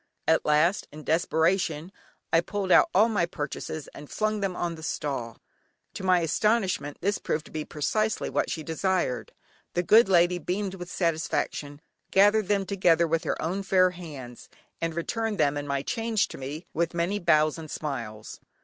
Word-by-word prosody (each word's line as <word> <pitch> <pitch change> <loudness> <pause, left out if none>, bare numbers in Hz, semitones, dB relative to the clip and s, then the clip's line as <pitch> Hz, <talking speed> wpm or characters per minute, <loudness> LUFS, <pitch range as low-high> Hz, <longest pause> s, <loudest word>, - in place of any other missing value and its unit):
At 160 - +3
last, 155 +6 +3
in 155 +1 -10
desperation, 165 +1 +1 0.4
I 165 - +6
pulled 195 +1 -3
out 340 - +6
all 215 - +5
my 205 -7 +1
purchases 155 -1 -5
and 150 - -12
flung 215 0 -1
them 195 -2 -2
on 175 -1 -2
the 160 - -10
stall. 135 -7 -3 0.6
To - - -7
my 185 -2 +4
astonishment 185 -3 0
this 200 +2 0
proved 155 +1 -2
to - - -14
be 155 -1 -4
precisely 215 +8 -1
what - - -1
she 160 - -3
desired; 165 -5 -1 0.4
the 175 - +1
good 215 +3 +6
lady 175 -1 +4
beamed 190 +3 -2
with 180 -2 -8
satisfaction, 155 -4 -2 0.3
gathered 205 +1 +4
them 200 -1 +1
together 175 -4 +3
with 165 +1 0
her - - -1
own 185 +5 -2
fair 185 -2 +3
hands, 145 -9 -10 0.3
and 165 -1 -2
returned 220 +5 -2
them, 145 -3 +2
and 145 0 -4
my 140 -1 -1
change, 225 +4 0
to - - -9
me 145 +6 -6
with 170 +1 -1
many 175 +5 0
bows 155 -3 +3
and 155 -1 -8
smiles. 115 -9 -5
170 Hz, 175 wpm, -27 LUFS, 155-195 Hz, 0.6 s, I